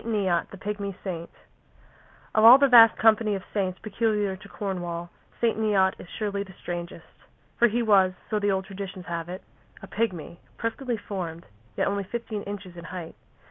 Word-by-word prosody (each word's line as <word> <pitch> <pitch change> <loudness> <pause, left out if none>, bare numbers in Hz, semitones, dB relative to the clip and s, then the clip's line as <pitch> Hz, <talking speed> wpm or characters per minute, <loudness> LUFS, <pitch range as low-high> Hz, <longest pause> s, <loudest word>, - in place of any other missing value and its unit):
NEOT, 195 -7 0
THE 195 - -10
PIGMY 200 -1 -4
SAINT 170 -3 -5 1.0
Of 215 - +3
all 235 +3 +11
the 280 0 +4
vast 230 -3 +8
company 220 -1 +4
of 190 - -5
saints 190 -3 -1
peculiar 210 -2 0
to 190 - -14
Cornwall, 175 -3 -4 0.3
St. 230 -2 +1
Neot 195 -3 +3
is - - -10
surely 205 -2 -3
the 190 -2 -9
strangest, 175 0 -6 0.5
for 240 - +6
he 235 +2 0
was, 195 -4 +4
so 215 - 0
the 205 0 +1
old 190 0 -1
traditions 190 -2 -7
have 170 -1 -4
it, 185 +2 -7 0.4
a - - -10
pigmy, 180 -7 -3 0.2
perfectly 235 +1 -2
formed, 175 -5 -6 0.3
yet - - +2
only 200 0 -1
fifteen 220 +1 -5
inches 200 -3 -7
in 170 -1 -9
height. 175 -2 -7
200 Hz, 175 wpm, -26 LUFS, 185-215 Hz, 1.0 s, all